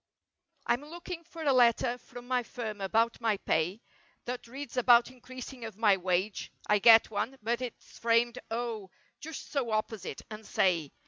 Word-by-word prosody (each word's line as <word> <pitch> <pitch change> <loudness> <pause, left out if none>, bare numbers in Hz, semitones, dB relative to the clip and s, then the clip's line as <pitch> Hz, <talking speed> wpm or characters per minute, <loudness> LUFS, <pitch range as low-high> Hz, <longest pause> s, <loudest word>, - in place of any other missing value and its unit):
Fm 285 +5 0
looking 345 0 -7
for 335 -1 -9
a 280 -3 +3
letter 240 -1 +4
from 245 -1 -12
my 250 -1 +1
firm 225 -4 -6
about 225 +5 +1
my 220 -3 +2
pay; 180 +6 -1 0.4
That 245 0 -5
reads 275 +4 -8
about 245 -1 +5
increasing 255 0 -9
of 220 -3 -7
my 215 -3 +5
wage— 185 +2 -1
I 210 0 +3
get 225 +1 +7
one—but 235 +1 -2
it's 250 -2 -8
framed 235 +1 +2
O, 225 -4 -3 0.3
just 320 0 -8
so 275 -5 -1
opposite—and 215 -1 -4
say! 170 -6 +1
235 Hz, 150 wpm, -30 LUFS, 215-255 Hz, 0.4 s, get